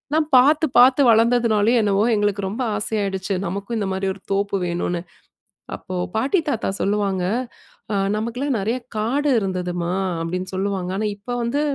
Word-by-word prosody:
நான் 315 -1 +2
பாத்து, 300 +5 +5
பாத்து 255 +3 +6
வளர்ந்ததுனாலயோ! 230 0 +3
என்னவோ 205 0 +2
எங்களுக்கு 205 -1 0
ரொம்ப 220 +6 -4 0.2
ஆசையாயிடுச்சு, 200 -2 -2
நமக்கும் 200 +6 -4
இந்த 200 -2 -2
மாதிரி 190 +1 -2
ஒரு 195 - -17
தோப்பு 200 0 0
வேணுனு. 175 0 -2 0.7
அப்போ 185 - -8 0.2
பாட்டி 270 - +2
தாத்தா 235 -5 -1
சொல்லுவாங்க, 200 -2 0 0.7
"ஆ - - +1 0.2
நமக்கெல்லாம் 245 +5 -2
நிறைய 225 +6 -1 0.2
காடு 260 +8 0
இருந்ததும்மா" 180 -3 -2 0.3
அப்பிடின்னு 180 +3 -4
சொல்லுவாங்க. 190 -1 -2
ஆனா 215 - -1
இப்ப 205 - -32
வந்து 240 +5 0
205 Hz, 145 wpm, -21 LUFS, 190-235 Hz, 0.7 s, பாத்து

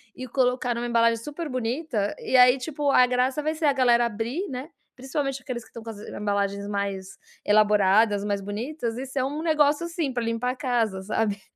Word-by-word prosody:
e 255 - -7
colocar 250 -1 0
numa 235 +1 -3
embalagem 230 -1 +3
super 305 +3 -5
bonita. 245 -3 -2
E, - - -2
aí 250 +1 +7
tipo, 290 +1 -2
a 250 - +6
graça 255 +3 0
vai 310 +1 -1
ser 315 0 -2
a 285 - +4
galera 240 -2 +4
abrir, 235 - -3
né, 260 +3 -6 0.3
principalmente 270 +1 -3
aqueles 245 -2 -5
que - - -20
estão 230 - -10
com 230 - -8
as 210 - -8
embalagens 200 -1 -2
mais 200 -2 -4 0.3
elaboradas, 210 0 +4
mais 205 -1 -1
bonitas. 230 +4 -4
E 260 - -4
ser, 265 0 -2
um 290 +3 -3
negócio, 305 -1 +2
assim, 335 -4 -2
pra 245 - -1
limpar 230 +2 -1
a - - -6
casa, 235 -8 -1
sabe? 205 0 -1
245 Hz, 195 wpm, -25 LUFS, 210-270 Hz, 0.3 s, aí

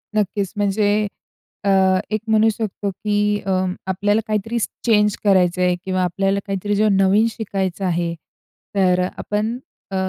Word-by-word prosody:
नक्कीच 200 -2 -1
म्हणजे 205 +1 +1 0.6
अ, 200 - +1 0.4
एक 215 -1 -1
म्हणू 220 0 +4
शकतो 205 -2 -3
की 205 +1 0
अ, 195 - -1 0.4
आपल्याला 205 +3 +1
काहीतरी 215 +2 -1 0.3
चेंज 210 -3 +3
करायचं 185 -3 +3
आहे 180 0 +3
किंवा 185 -1 0
आपल्याला 195 +3 0
काहीतरी 200 +1 -1
जेव्हा 210 -1 +3
नवीन 195 +3 +4
शिकायचं 195 -4 -3
आहे. 170 -1 0 0.6
तर 185 -2 +3
अ, - - 0
आपण 215 +3 -2 0.3
अ, - - -3
200 Hz, 145 wpm, -20 LUFS, 190-210 Hz, 0.6 s, म्हणू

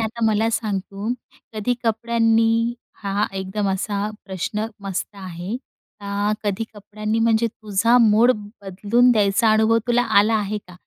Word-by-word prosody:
आता 225 +1 -2
मला 220 +1 +2
सांग 215 -3 -1
तू, 200 +4 -5 0.4
कधी 215 +3 0
कपड्यांनी 230 +1 +2 0.3
हा 200 +1 0
एकदम 190 +2 -2
असा 200 +2 -1 0.2
प्रश्न 200 +3 -3
मस्त 195 +1 -4
आहे. 185 +2 -5 0.4
आ, 205 +1 -1
कधी 205 +2 -1
कपड्यांनी 215 +2 -3
म्हणजे 225 0 +3
तुझा 215 +2 +1
मूड 225 +2 +5 0.3
बदलून 205 +6 +2
द्यायचा 210 +1 +3
अनुभव 220 +1 +4
तुला 240 0 +3 0.2
आला 215 +2 +4
आहे 210 0 -2
का? 180 -3 -17
215 Hz, 140 wpm, -22 LUFS, 200-225 Hz, 0.4 s, मूड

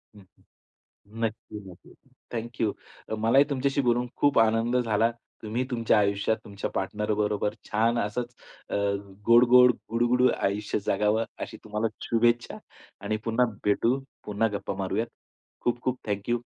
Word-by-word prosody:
हं. 100 - -14 1.0
नक्की, 110 -1 -4
नक्की 90 - -15 0.4
थँक 120 +2 -5
यू. 110 - +2 0.5
मलाही 115 +6 +5
तुमच्याशी 140 +1 0
बोलून 120 0 +1
खूप 145 -5 +3
आनंद 115 +2 +2
झाला. 115 -1 +2 0.3
तुम्ही 115 +4 -1
तुमच्या 115 -2 +2
आयुष्यात 100 +2 +1
तुमच्या 100 -1 -5
पार्टनरबरोबर 105 +1 -1 0.2
छान 115 +2 +2
असच 120 +4 -3 0.4
अ, - - -2 0.5
गोड, 120 +1 +7
गोड 125 0 +8 0.2
गुडगुडू 120 +2 +3
आयुष्य 105 +2 -1
जगावं 105 +3 +2 0.2
अशी - - -11
तुम्हाला 110 +1 -1 0.2
शुभेच्छा 120 +1 +1 0.5
आणि 110 +1 -1
पुन्हा 115 +2 +3 0.2
भेटू. 115 +6 +2 0.3
पुन्हा 105 +2 +1
गप्पा 100 - -5
मारूयात. 110 +5 -1 0.5
खूप-खूप 125 +1 -1
थँक 100 +2 -3
यू. 120 0 +2
115 Hz, 130 wpm, -27 LUFS, 105-120 Hz, 1.0 s, गोड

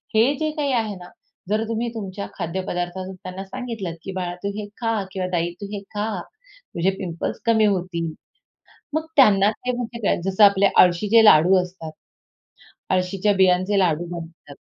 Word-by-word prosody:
हे 240 +6 +4
जे 310 0 0
काही 285 -2 0
आहे 220 -4 0
ना, 180 -1 -11 0.4
जर 215 +1 +1
तुम्ही 230 +1 -2
तुमच्या 200 -2 -5
खाद्यपदार्थातून 185 +1 -4
त्यांना 185 +1 -8
सांगितलतं, 220 -6 -5
की 195 - -5
"बाळा 180 -1 -3
तू 200 - -1
हे 210 -1 -5
खा 225 -3 0
किंवा 185 -1 -3
ताई 170 0 0
तू - - -4
हे 200 - -4
खा, 210 +2 -1 0.7
तुझे 175 +3 +2
पिंपल्स 170 -3 -4
कमी 220 -2 +4
होतील." 180 -4 -1 0.8
मग 315 0 -1
त्यांना 210 -8 +6
ते 250 +3 -4
म्हणजे 235 -1 -5
काय, - - +2
जसं 195 +2 +3
आपले 200 -1 +6 0.2
आळशीचे 205 +6 +4
लाडू 180 0 +7
असतात. 180 -3 -8 1.0
आळशीच्या 190 +2 +1
बियांचे 190 +1 +3
लाडू 175 -2 +1
बनतात. 165 -4 -9
195 Hz, 160 wpm, -22 LUFS, 180-220 Hz, 1.0 s, लाडू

